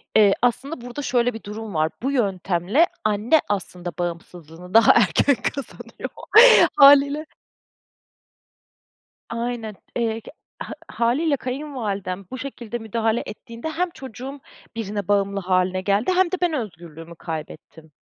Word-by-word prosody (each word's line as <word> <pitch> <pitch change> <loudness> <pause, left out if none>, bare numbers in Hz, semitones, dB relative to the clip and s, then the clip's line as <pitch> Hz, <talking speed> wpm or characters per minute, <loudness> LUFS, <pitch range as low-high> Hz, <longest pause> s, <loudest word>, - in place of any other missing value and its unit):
Eee, 205 -2 +6
aslında 250 +4 -1
burada 245 +4 -7
şöyle 245 -2 +1
bir 225 - -9
durum 210 0 -7
var, 155 0 +1
bu 270 - 0
yöntemle 195 - +1 0.2
anne 215 +8 +2
aslında 180 -3 -3
bağımsızlığını 175 0 -7
daha 225 0 +7
erken 280 - +3
kazanıyor 275 +2 -6 0.7
hâliyle. 280 +2 +6 2.0
Aynen, 230 -2 -4 0.2
eee, 225 -1 -1 0.4
ha - - -5 0.2
hâliyle 275 +6 +1
kayınvalidem 220 -9 -4
bu 260 - -5
şekilde 240 -4 -6
müdahale 225 0 -1
ettiğinde 235 +6 -8
hem 350 +3 -1
çocuğum 265 -1 -9 0.4
birine 205 -3 -4
bağımlı 200 -1 +1
hâline 185 0 0
geldi 200 - +1
hem 370 -1 +3
de - - +1
ben 350 -2 +1
özgürlüğümü 170 - -7
kaybettim. 160 -1 -8
225 Hz, 120 wpm, -22 LUFS, 185-260 Hz, 2.0 s, daha